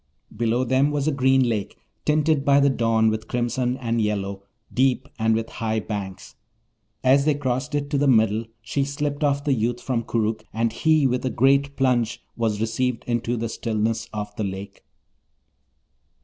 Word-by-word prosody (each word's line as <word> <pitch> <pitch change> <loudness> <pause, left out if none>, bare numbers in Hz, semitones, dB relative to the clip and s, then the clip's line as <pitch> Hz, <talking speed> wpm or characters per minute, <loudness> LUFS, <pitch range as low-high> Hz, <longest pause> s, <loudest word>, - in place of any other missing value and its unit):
Below 120 +3 +1
them 130 +3 +2
was 145 -1 -1
a - - +3
green 130 -2 +3
lake, 105 -4 -2 0.3
tinted 155 -1 +2
by 140 0 +5
the 140 0 +4
dawn 115 -3 +2
with 110 0 -4
crimson 125 +1 -1
and 115 -3 -1
yellow, 100 -2 -2 0.3
deep, 130 +1 +2
and 110 0 +3
with 115 0 -2
high 110 -1 -1
banks. 100 -1 -6 0.7
As 135 +2 +5
they 150 -2 +3
crossed 130 +1 -2
it 145 -1 -2
to 140 - +1
the 145 - +2
middle, 110 -3 +3 0.2
she 135 +4 -1
slipped 145 +1 -3
off 140 -1 +1
the 145 - +2
youth 120 0 -1
from 120 -2 -1
Koorookh, 110 -1 -1
and 115 0 0
he 155 -2 +3
with 125 -1 +1
a 130 - 0
great 140 +3 +2
plunge 125 -4 +1 0.2
was 110 -3 -1
received 115 +2 -1
into 120 0 -1
the 115 +1 -2
stillness 110 0 -2
of 105 -1 -5
the 110 - -1
lake. 100 0 -6
120 Hz, 175 wpm, -23 LUFS, 110-135 Hz, 0.7 s, by